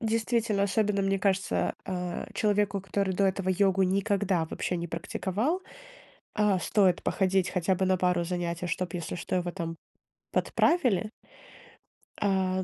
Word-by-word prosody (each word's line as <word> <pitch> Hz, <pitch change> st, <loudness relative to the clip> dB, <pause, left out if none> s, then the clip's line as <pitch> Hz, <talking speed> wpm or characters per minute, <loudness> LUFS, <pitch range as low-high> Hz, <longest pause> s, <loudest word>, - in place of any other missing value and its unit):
Действительно, 225 Hz, -2 st, +1 dB
особенно 200 Hz, 0 st, +1 dB
мне 195 Hz, 0 st, +1 dB
кажется, 190 Hz, -1 st, 0 dB
а, 180 Hz, -2 st, -4 dB
человеку, 205 Hz, -1 st, +1 dB
который 195 Hz, +1 st, -1 dB
до 200 Hz, -, +2 dB
этого 190 Hz, 0 st, -1 dB
йогу 195 Hz, 0 st, +3 dB
никогда 195 Hz, -2 st, +1 dB
вообще 180 Hz, +2 st, -3 dB
не 170 Hz, 0 st, -3 dB
практиковал, 200 Hz, -, -2 dB, 0.8 s
а, 210 Hz, -3 st, +3 dB
стоит 185 Hz, -2 st, +2 dB
походить 190 Hz, -1 st, +1 dB
хотя 180 Hz, +1 st, +1 dB
бы 190 Hz, +1 st, 0 dB
на 185 Hz, 0 st, +3 dB
пару 180 Hz, -1 st, +1 dB
занятий, 175 Hz, 0 st, -3 dB
чтоб, 180 Hz, +1 st, -2 dB
если 170 Hz, -2 st, -4 dB
что, 180 Hz, +1 st, -2 dB
его 175 Hz, -1 st, -1 dB
там 170 Hz, -2 st, -4 dB, 0.6 s
подправили. 230 Hz, -, +2 dB, 1.1 s
А, 190 Hz, -2 st, +1 dB
190 Hz, 140 wpm, -28 LUFS, 180-200 Hz, 1.1 s, йогу